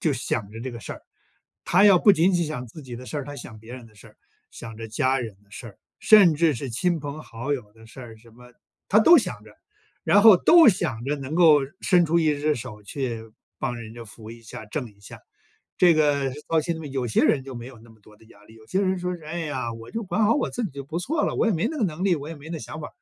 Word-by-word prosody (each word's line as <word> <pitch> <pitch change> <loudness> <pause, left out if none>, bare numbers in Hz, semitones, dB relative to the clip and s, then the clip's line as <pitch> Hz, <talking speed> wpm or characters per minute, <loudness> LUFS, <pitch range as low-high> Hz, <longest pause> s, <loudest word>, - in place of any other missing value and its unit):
就 155 - +1
想 115 -5 -3
着 115 +1 -9
这 130 +1 -5
个 115 - -9
事 - - -7
儿。 - - -12 0.6
他 185 +4 +4
要 200 -3 +7
不 205 - +5
仅 185 +1 +2
仅 175 -1 +1
想 125 -5 -5
自 145 +6 -12
己 125 -2 -8
的 125 +1 -11
事 - - -6
儿， 140 - -5
他 145 +1 -9
想 110 -5 -10
别 115 +3 -13
人 125 -2 -10
的 110 - -21
事 105 - -16
儿， - - -23 0.3
想 115 -2 -10
着 115 0 -8
家 130 +4 0
人 110 -5 -7
的 100 - -32
事 115 +3 -9
儿， 100 - -17 0.2
甚 200 -7 +6
至 160 +1 +2
是 135 +3 -6
亲 170 +8 0
朋 145 +1 -7
好 120 +5 -5
友 105 -7 -5
的 110 0 -18
事 115 - -13
儿 115 -3 -11
什 115 +1 -20
么， 125 +1 -17 0.4
他 210 - +4
都 330 +11 +7
想 - - -2
着。 - - -16 0.5
然 205 - +4
后 220 -2 +9
都 330 - +6
想 120 - -1
着 145 +2 -1
能 140 +1 -6
够 160 -4 +6 0.2
伸 180 -2 +4
出 170 +2 +2
一 155 -2 +2
只 150 +1 +1
手 105 -2 -9
去 115 +1 -5 0.4
帮 120 - -3
人 110 -1 -10
家 120 - -9
扶 110 0 -13
一 115 0 -12
下、 110 0 -10
挣 125 +1 -5
一 100 - -30
下。 100 - -12 0.6
这 175 -2 +5
个 145 -3 +1 0.2
到 165 - +2
现 165 +1 -4
在 155 - -8
有 135 -3 -3
些 110 - +1
人 135 -3 +2
就 135 -1 -9
没 120 0 -8
有 130 -3 -14
那 115 +1 -18
么 110 -1 -21
多 105 +1 -20
的 - - -22
压 105 -2 -20
力， 110 - -18
有 110 -1 -18
些 190 - -1
人 190 -1 0
说 180 0 -3
是： 165 - -18
“唉 165 +3 -5
呀！ 130 -7 -4
我 115 0 -11
就 230 - -4
管 215 +2 0
好 215 - +3
我 290 - -1
自 240 - -3
己 205 - -4
就 140 0 -7
不 160 +4 -4
错 295 - -1
了， - - -3
我 - - +1
也 225 - +2
没 180 +7 0
那 315 - -6
个 225 - +1
能 170 0 -4
力， 180 -4 +2
我 145 +1 -7
也 165 - -7
没 145 +2 -12
那 165 - -4
想 120 +6 -8
法。 150 - -7
140 Hz, 310 characters per minute, -24 LUFS, 115-170 Hz, 0.6 s, 后